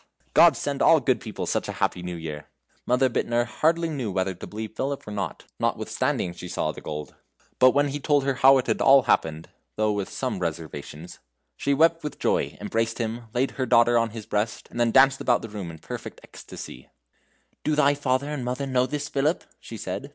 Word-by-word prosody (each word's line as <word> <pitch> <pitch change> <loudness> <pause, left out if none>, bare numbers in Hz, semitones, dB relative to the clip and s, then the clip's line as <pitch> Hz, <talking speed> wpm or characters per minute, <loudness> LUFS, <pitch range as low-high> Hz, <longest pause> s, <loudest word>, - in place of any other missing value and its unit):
Gods - - +7
send - - -3
all - - +6
good - - +1
people - - -5
such - - -1
a - - -3
happy 90 - -1
New 90 0 -5
Year!" 80 -3 -7 0.4
Mother 125 +2 +3
Bittner 120 -1 0
hardly 165 +7 +1
knew 135 -9 -3
whether 95 0 -1
to 90 - -10
believe 110 0 -7
Philip 140 -2 -3
or - - -6
not, 100 -1 -4
notwithstanding 85 - -1
she 90 - -9
saw 85 -3 -1
the - - -11
gold. 75 0 -6 0.5
But 130 - +8
when 145 0 +3
he 145 +1 -4
told 145 0 +2
her 135 0 +1
how 135 +1 +6
it 130 - 0
had - - 0
all 135 -1 +7
happened 80 -9 0 0.3
though 110 0 +1
with 100 -2 -2
some 130 -7 -3
reservations 80 -1 -6 0.4
she 140 0 0
wept 165 +2 +3
with 150 - -5
joy, - - 0
embraced 115 +2 -1
him, 115 0 -3
laid 130 +2 +1
her - - -18
her 130 - 0
daughter 120 +1 +5
on 115 -1 +3
his 110 -1 -8
breast, 105 +2 -2
and - - -6
then 120 -1 +3
danced 135 +2 +5
about 120 - +2
the 115 - -6
room 100 -5 -6
in 80 - -8
a - - -21
perfect - - -8
ecstasy, 65 - -11 0.7
"Do 155 - +1
thy 145 -1 +4
father 140 -1 0
and 145 -4 -3
mother 125 +3 -2
know 130 -1 +1
this, 145 0 -3
Philip?" 145 +4 0 0.2
she 115 - -9
said. 105 +8 -5
120 Hz, 215 wpm, -25 LUFS, 100-135 Hz, 0.7 s, But